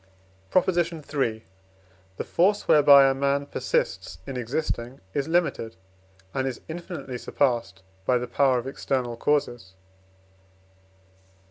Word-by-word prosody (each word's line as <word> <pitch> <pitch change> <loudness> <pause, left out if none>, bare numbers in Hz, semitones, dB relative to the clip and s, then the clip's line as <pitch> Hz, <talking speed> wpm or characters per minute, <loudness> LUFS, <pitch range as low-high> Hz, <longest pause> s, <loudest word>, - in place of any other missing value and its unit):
PROP. 185 - +3
III. 155 -10 -1 0.7
The - - -2
force 200 +4 +1
whereby 140 -2 +8
a 135 - +3
man 140 +1 0
persists - - -2
in 135 - -6
existing 125 0 -3
is 140 +1 -1
limited, 165 -9 0 0.6
and 130 0 -1
is 130 - -4
infinitely 160 -6 -6
surpassed 115 -11 -1 0.2
by 125 +6 +2
the 125 - -3
power 130 +1 +2
of 120 - -3
external 130 -2 -2
causes. 120 -7 -1
135 Hz, 115 wpm, -25 LUFS, 120-155 Hz, 0.7 s, whereby